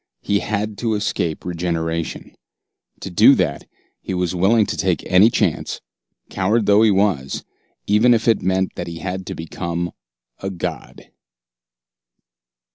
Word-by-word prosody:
He 100 0 +1
had 105 0 -3
to 115 -2 0
escape 85 -6 -2
regeneration. 85 -2 -3 0.7
To - - -6
do - - +6
that, - - -1 0.3
he 95 - -4
was 90 -1 -1
willing 100 +5 +3
to - - -3
take - - -1
any 95 +5 +5
chance, - - -1 0.5
coward 105 +4 0
though 105 +1 +5
he 110 - +5
was 95 -9 0 0.4
even 110 +4 +4
if 115 - -2
it 115 - +3
meant 95 +1 0
that 90 - -6
he 85 0 -6
had 95 +1 -5
to - - -5
become 85 +1 -4 0.5
a 95 - -4
god! 90 -4 -6
95 Hz, 140 wpm, -20 LUFS, 85-105 Hz, 0.7 s, do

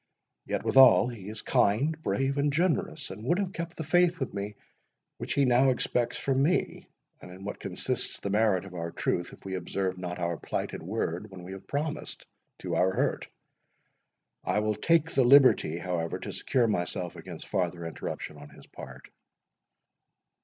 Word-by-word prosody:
—Yet, - - -2
withal, 130 -2 +7
he 105 -5 -8
is 110 0 -7
kind, 130 +11 +2
brave, 135 -2 0
and 145 +1 +2
generous, 160 -1 0
and 100 +3 -8
would 175 +9 +2
have 195 -2 -2
kept 170 0 -5
the 160 - -3
faith 175 +2 +3
with - - -3
me 100 +1 -4 0.6
which - - -3
he 140 - +4
now 125 +2 +4
expects 120 -1 0
from 135 -1 0
me; 170 +7 0 0.3
and - - -11
in 90 +2 -11
what 105 - -5
consists - - -2
the 100 - -3
merit 105 -3 +2
of 95 - -11
our 85 -1 -4
truth, 85 +1 -2
if - - -15
we 95 - -4
observe 95 +1 -2
not 90 -1 -4
our 85 -2 -2
plighted - - -4
word 95 +1 -3
when 95 -2 -10
we 90 - -8
have 95 0 -9
promised, 150 +2 -4 0.3
to - - -5
our 95 - +3
hurt? - - 0 1.2
I - - 0
will 105 0 +1
take 165 +6 +2
the 135 - +3
liberty, 130 - +6
however, 85 -2 -2
to - - -7
secure 125 -3 +1
myself 90 -4 -2
against 90 -3 -9
farther 90 -3 -1
interruption 75 -2 -6
on 75 0 -11
his - - -16
part." - - -11
105 Hz, 175 wpm, -28 LUFS, 90-140 Hz, 1.2 s, withal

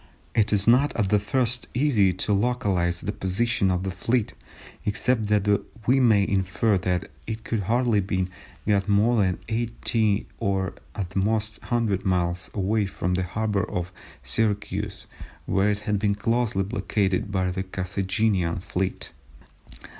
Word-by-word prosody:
It 105 -2 +2
is 105 -1 +3
not 130 +5 +4
at 105 -4 0
the 105 - +4
first 120 +3 0
easy 120 -8 +3
to 95 +3 +1
localise 100 -6 +1
the 105 - -2
position 100 +1 0
of 90 0 0
the 95 - -2
fleet, 115 +4 0 0.5
except 110 +1 0
that 105 -1 +2 0.4
we 130 +4 +4
may 110 -6 +4
infer 95 +1 +1
that 90 0 -2 0.2
it 110 0 -4
could 115 - -1
hardly 115 +2 +2
have 95 -1 0 0.4
got 100 -1 +2
more 110 +4 +3
than 95 -4 +2
80 110 -2 0
or 95 -1 0 0.2
at 95 -3 -4
the 95 - -1
most 110 +2 0
100 115 -5 0
miles 90 -1 0
away 105 +1 +1
from 90 -1 -2
the 90 - +1
harbour 100 +2 -1
of 90 -2 -3 0.3
Syracuse 100 - -1 0.4
where 95 +2 +2
it 105 0 0
had 105 -2 +1
been 100 0 +1
closely 115 -1 0
blockaded 100 -2 -1
by 95 -1 0
a 95 - -1
Carthaginian 95 -1 -1
fleet. 95 +1 -3
100 Hz, 150 wpm, -25 LUFS, 95-110 Hz, 0.5 s, not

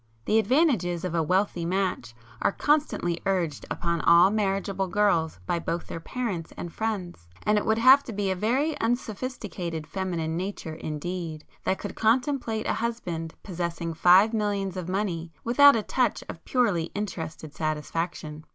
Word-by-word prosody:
The 220 - +3
advantages 220 - +2
of 180 - -3
a 170 - +2
wealthy 180 +2 +1
match 180 -8 -1 0.3
are - - +3
constantly 285 - 0
urged 175 -6 -1
upon 170 -1 -1
all 170 +3 +6
marriageable 195 -2 0
girls 175 - +1
by 170 - 0
both 170 +1 -3
their - - -6
parents 195 -3 -4
and 170 - -6
friends,—and 180 - -3
it - - -5
would 220 0 +3
have 260 +4 +7
to 240 - -6
be 200 -2 -1
a - - 0
very 260 - +1
unsophisticated 215 - -3
feminine 165 -1 -3
nature 180 -3 -4
indeed 160 +1 -5 0.2
that 190 - +1
could 205 - -6
contemplate 235 -1 +1
a - - +1
husband 180 -9 -3
possessing 170 -2 -3
five 185 +7 +6
millions 200 -3 -1
of 180 -1 -5
money, 180 -4 -2
without 285 +4 +7
a 220 - 0
touch 250 +2 0
of 165 - -8
purely 210 -10 +2
interested 160 -7 -5
satisfaction. 155 0 -3
190 Hz, 150 wpm, -26 LUFS, 165-220 Hz, 0.3 s, have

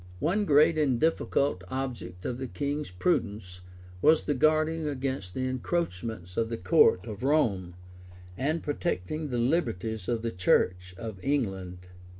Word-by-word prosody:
] - - -18
One 205 +3 +1
great 155 0 +5
and 135 -6 +2
difficult 140 - +1
object 120 -8 -5
of 125 0 -3
the 130 - -3
king's 140 +7 -3
prudence 95 - -1 0.4
was 155 +1 +5
the 145 - 0
guarding 155 +3 +2
against 130 -9 -3
the 130 0 -1
encroachments 115 - -3
of 115 -1 +1
the 115 - -3
court 90 0 +4
of 105 -3 -7
Rome, 105 - +1 0.6
and 155 - -1
protecting 150 - -2
the 125 - -2
liberties 115 - -1
of 115 -2 -1
the 115 - -1
church 90 0 +1
of 110 -3 -6
England. 95 -10 -2
120 Hz, 150 wpm, -28 LUFS, 90-150 Hz, 0.6 s, great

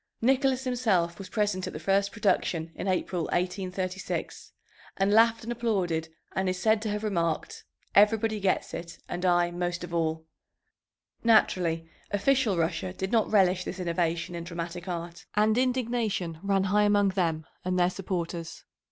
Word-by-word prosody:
Nicholas 265 +1 +2
himself 215 -10 +1
was 190 -1 -8
present 205 -3 0
at - - -6
the 155 - -5
first 195 +4 +1
production 175 -6 0
in - - -5
April, 180 -2 0
1836, 185 +1 -3 0.5
and 195 +1 +2
laughed 230 +1 +5
and 230 - -4
applauded, 190 -9 -1 0.3
and 190 0 +1
is 185 - -1
said 220 +3 +2
to 220 - -2
have 210 +1 -2
remarked, 170 -6 -2 0.3
"Everybody 215 +1 +4
gets 195 -2 0
it, 170 0 -6
and 175 +1 -4
I 175 -1 +3
most 175 0 -2
of 175 -1 -7
all." 160 -1 -1 1.0
Naturally 175 -7 +3 0.2
official 215 0 +2
Russia 165 +2 -1
did 190 0 -4
not 225 -2 +2
relish 185 -3 +4
this 190 - -6
innovation 170 0 -1
in 170 -1 -5
dramatic 170 +1 -6
art, 170 -1 -6
and 215 +1 +3
indignation 235 -9 0
ran 195 -1 +1
high 200 +2 +3
among 205 -1 +4
them 165 -5 -1 0.2
and 185 0 0
their 180 0 +3
supporters. 175 -3 -4
185 Hz, 155 wpm, -28 LUFS, 170-210 Hz, 1.0 s, laughed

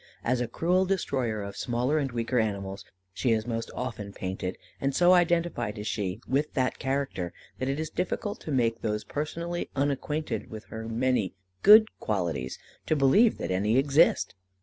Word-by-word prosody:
As 125 +1 +1
a 120 - -1
cruel 180 +9 +2
destroyer 130 - -1
of 100 0 -7
smaller 125 +6 0
and 135 -3 -1
weaker 120 +1 0
animals 100 -3 -2 0.3
she 125 - 0
is 110 -1 0
most 115 -1 -3
often 110 -5 -5
painted, 95 -1 -4 0.2
and 135 0 -1
so 180 +1 +6
identified 170 - +2
is 105 - -5
she 100 -2 -2
with 145 +3 0
that 130 -3 0
character, 135 -10 -2 0.3
that 130 - -1
it 140 +2 -1
is 155 0 -3
difficult 205 +4 -2
to 155 - -6
make 115 -4 +1
those 105 -1 -1
personally 170 +6 -3
unacquainted 145 +2 -1
with 110 -2 -8
her 110 0 -5
many 115 -4 0 0.3
good 215 +1 +9
qualities 85 -11 -2 0.3
to 155 - +3
believe 155 - +5
that - - -3
any 105 +6 +2
exist. 140 +4 +4
125 Hz, 170 wpm, -28 LUFS, 110-155 Hz, 0.3 s, good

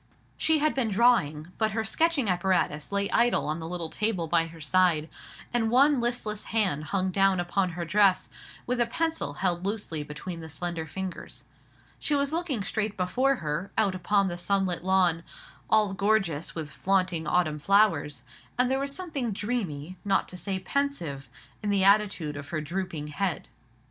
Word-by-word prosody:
She 320 -1 +3
had 305 +1 +2
been 250 -5 0
drawing; 190 -8 +2
but 220 -2 +1
her 220 0 -1
sketching 320 +1 +1
apparatus 180 -4 0
lay 200 0 +1
idle 240 +1 +3
on 155 +2 -2
the 160 - -6
little 170 -2 -3
table 210 -6 0
by 165 0 +2
her 165 0 -12
side, 160 0 +2 0.5
and 230 -2 +1
one 275 +3 +5
listless 235 -3 -2
hand 190 -9 0
hung 185 +4 -1
down 195 0 +3
upon 180 +1 0
her 170 0 -4
dress, 195 +2 +3 0.4
with 245 0 0
a 235 - +2
pencil 320 - -1
held 175 +2 -1
loosely 200 -6 -3
between 150 +4 -7
the 160 -1 -8
slender 165 +1 -4
fingers. 190 +2 -6 0.6
She 295 - 0
was 280 +1 0
looking 320 - -1
straight 215 0 -2
before 250 +10 +2
her, 150 +6 -2
out 205 -3 +2
upon 195 +2 +1
the 175 -1 -4
sunlit 185 -1 0
lawn, 185 -3 +3 0.5
all 215 -3 +4
gorgeous 195 -6 0
with 155 -2 -5
flaunting 180 +3 0
autumn 155 -4 +1
flowers; 155 - +2 0.3
and 250 +1 +2
there 265 - +1
was 275 0 -3
something 300 -11 -3
dreamy, 190 -7 -3
not 195 -1 +1
to - - -9
say 190 +2 -3
pensive, 185 - -3 0.3
in 210 - -2
the 200 -2 +2
attitude 195 -7 +3
of 145 0 -7
her 160 - -2
drooping 155 -1 -4
head. 185 +3 -2
190 Hz, 170 wpm, -27 LUFS, 165-220 Hz, 0.6 s, one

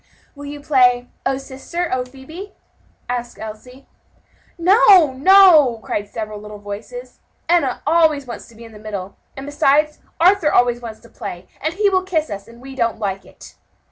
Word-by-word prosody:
"Will 285 0 -11
you 290 0 -8
play 250 -4 +2 0.2
'O 270 0 0
sister, 275 +6 -5
O 255 -1 0
Phebe?'" 315 +10 -11 0.5
asked 240 -1 -4
Elsie. 235 +5 -10 0.7
"No, 365 - +5
no!" 310 - +6
cried 205 0 -4
several 215 -2 -6
little 210 0 -10
voices, 205 - -9 0.3
"Enna 330 -7 +1
always 310 -2 +2
wants 240 - -9
to 235 - -18
be 230 - -13
in 225 - -13
the 210 - -13
middle; 200 -3 -7 0.2
and 270 - -7
besides, 295 +1 +1 0.2
Arthur 350 -2 +4
always 245 0 +2
wants 225 -2 -9
to 235 - -18
play, 185 -4 -8
and 315 +3 -2
he 415 +1 +2
will 375 -2 +2
kiss 335 -5 -2
us; 200 0 -7
and 235 +1 -15
we 270 +1 -10
don't 235 -3 -1
like 195 -3 -4
it." - - -15
265 Hz, 170 wpm, -19 LUFS, 230-315 Hz, 0.7 s, no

